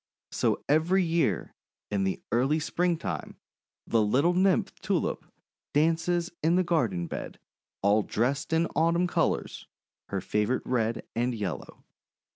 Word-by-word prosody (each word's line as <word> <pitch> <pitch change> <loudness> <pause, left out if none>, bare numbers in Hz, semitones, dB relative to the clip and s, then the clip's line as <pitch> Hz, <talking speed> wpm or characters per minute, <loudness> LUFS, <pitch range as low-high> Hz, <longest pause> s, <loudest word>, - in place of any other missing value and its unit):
So - - 0
every 165 +6 +3
year, 165 - 0 0.4
in 100 -2 +1
the 95 - -2
early 130 +7 +2
Springtime, 170 +1 -2 0.5
the 115 - +2
little 135 +11 +3
Nymph 185 +1 +2
Tulip - - -1 0.5
dances 165 +3 +2
in 165 +3 +3
the 185 - +3
garden 120 - 0
bed, - - -6 0.5
all 100 +2 +4
dressed 130 +9 -1
in 165 +1 +3
Autumn 170 +2 +3
colours, 175 - -1 0.4
her 100 - -2
favourite 105 +6 -1
red 115 -2 -1
and 120 +1 0
yellow. 95 - -5
145 Hz, 125 wpm, -28 LUFS, 110-170 Hz, 0.5 s, all